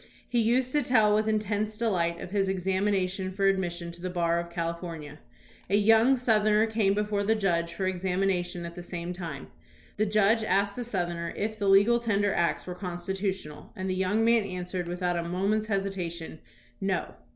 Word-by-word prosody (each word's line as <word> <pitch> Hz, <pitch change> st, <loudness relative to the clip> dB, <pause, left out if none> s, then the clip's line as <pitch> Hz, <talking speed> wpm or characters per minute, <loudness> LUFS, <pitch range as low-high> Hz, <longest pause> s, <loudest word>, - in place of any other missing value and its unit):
He 240 Hz, -, 0 dB
used 245 Hz, +3 st, +2 dB
to 295 Hz, -, +2 dB
tell 220 Hz, -5 st, +4 dB
with 215 Hz, +1 st, +2 dB
intense 215 Hz, 0 st, -1 dB
delight 175 Hz, -7 st, 0 dB
of 180 Hz, -, -8 dB
his 195 Hz, -1 st, +1 dB
examination 190 Hz, 0 st, 0 dB
for 195 Hz, +1 st, -1 dB
admission 175 Hz, -3 st, 0 dB
to 170 Hz, 0 st, -13 dB
the 185 Hz, -, -3 dB
bar 170 Hz, -1 st, +1 dB
of 170 Hz, 0 st, -5 dB
California. 165 Hz, -3 st, -5 dB, 0.5 s
A 200 Hz, -, +3 dB
young 225 Hz, +5 st, +5 dB
Southerner 215 Hz, -3 st, +3 dB
came 215 Hz, -3 st, +1 dB
before 210 Hz, -1 st, 0 dB
the 220 Hz, +2 st, +2 dB
judge 170 Hz, -5 st, 0 dB
for 190 Hz, -, -3 dB
examina 185 Hz, 0 st, 0 dB
tion 175 Hz, -1 st, -6 dB
at 170 Hz, -, -7 dB
the 175 Hz, -, -8 dB
same 175 Hz, 0 st, -5 dB
time. 165 Hz, -6 st, -7 dB, 0.5 s
The 215 Hz, +1 st, +1 dB
judge 215 Hz, +2 st, +3 dB
asked 200 Hz, -1 st, +1 dB
the 245 Hz, -, -3 dB
Southerner 175 Hz, -6 st, -3 dB
if 215 Hz, +1 st, -2 dB
the 200 Hz, -1 st, +1 dB
legal 205 Hz, +5 st, +5 dB
tender 205 Hz, -4 st, +1 dB
acts 170 Hz, -1 st, 0 dB
were 180 Hz, -, -5 dB
constitutional, 180 Hz, -3 st, -4 dB
and 185 Hz, 0 st, -4 dB
the 185 Hz, -, 0 dB
young 190 Hz, +4 st, +1 dB
man 230 Hz, 0 st, +5 dB
answered 180 Hz, -2 st, -4 dB
without 175 Hz, 0 st, -1 dB
a 170 Hz, 0 st, -3 dB
moment's 200 Hz, +4 st, 0 dB
hesitation, 180 Hz, -6 st, -3 dB, 0.4 s
"No." 195 Hz, -1 st, -1 dB
195 Hz, 185 wpm, -28 LUFS, 175-210 Hz, 0.5 s, young